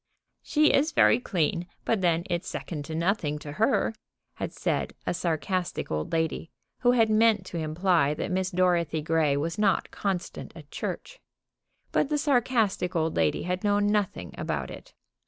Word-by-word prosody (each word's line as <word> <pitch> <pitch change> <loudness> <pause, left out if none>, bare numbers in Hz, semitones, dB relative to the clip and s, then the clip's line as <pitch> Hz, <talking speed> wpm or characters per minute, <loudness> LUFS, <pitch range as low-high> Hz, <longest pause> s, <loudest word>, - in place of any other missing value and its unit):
"She 305 0 +3
is 300 +3 +2
very 230 - +5
clean, 175 -5 -1 0.2
but 220 -4 +1
then 170 -2 +2
it's 175 +1 -2
second 150 -4 -5
to 160 - -5
nothing 165 -3 0
to 150 -1 -8
her," 225 - +1 0.4
had - - -4
said - - -2
a - - 0
sarcastic 175 +2 -2
old 75 0 -2
lady, 160 0 -1 0.3
who 245 0 +4
had 225 -2 +4
meant 215 -3 +4
to 170 - -5
imply 155 -2 +2
that 180 - -3
Miss 185 0 0
Dorothy 170 -4 +1
Grey 155 -3 +2
was 165 +7 -2
not 200 -4 +2
constant 190 -3 -4
at - - -13
church. - - -5 0.7
But 280 - +1
the 300 - +1
sarcastic 245 - +1
old 160 -1 0
lady 80 -2 +1
had 180 +1 -2
known 205 0 +2
nothing 195 - -1
about - - -3
it. - - -12
180 Hz, 165 wpm, -27 LUFS, 160-210 Hz, 0.7 s, very